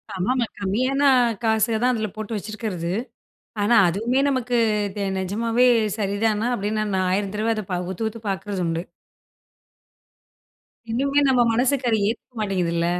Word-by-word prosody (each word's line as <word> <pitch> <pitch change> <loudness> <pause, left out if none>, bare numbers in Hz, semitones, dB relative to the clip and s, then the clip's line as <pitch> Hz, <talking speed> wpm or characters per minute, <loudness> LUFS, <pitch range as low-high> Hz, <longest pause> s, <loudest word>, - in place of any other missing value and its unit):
ஆமாமா. 235 +7 0
கம்மியான 250 +8 0 0.4
காசு 220 0 +2
தான் 250 0 +3
அதில 215 -1 -2
போட்டு 215 +1 -5
வச்சிருக்கிறது. 205 -5 -4 0.7
ஆனா, 220 +4 +3
அதுவுமே 225 +9 0
நமக்கு 250 -2 0 0.4
தே 200 - -1
நிஜமாவே 230 +6 +1 0.3
சரிதானா? 210 +2 0
அப்பிடின்னு 215 0 -1
நான் 185 -1 +1
1000 195 +1 -1
தடவ 220 +2 +1
அத 215 - -3
பா 180 - 0
உத்து, 205 +4 -3
உத்து 230 - -10
பார்க்கிறதுண்டு. 190 -4 -2 2.1
இன்னுமே 275 +4 +1
நம்ம 255 -2 +4
மனசுக்கு 255 +2 +1
அத - - +4
ஏத்துக்க 235 +2 -5
மாட்டேங்கிதுல்ல. 175 -5 0
215 Hz, 130 wpm, -23 LUFS, 195-240 Hz, 2.1 s, நம்ம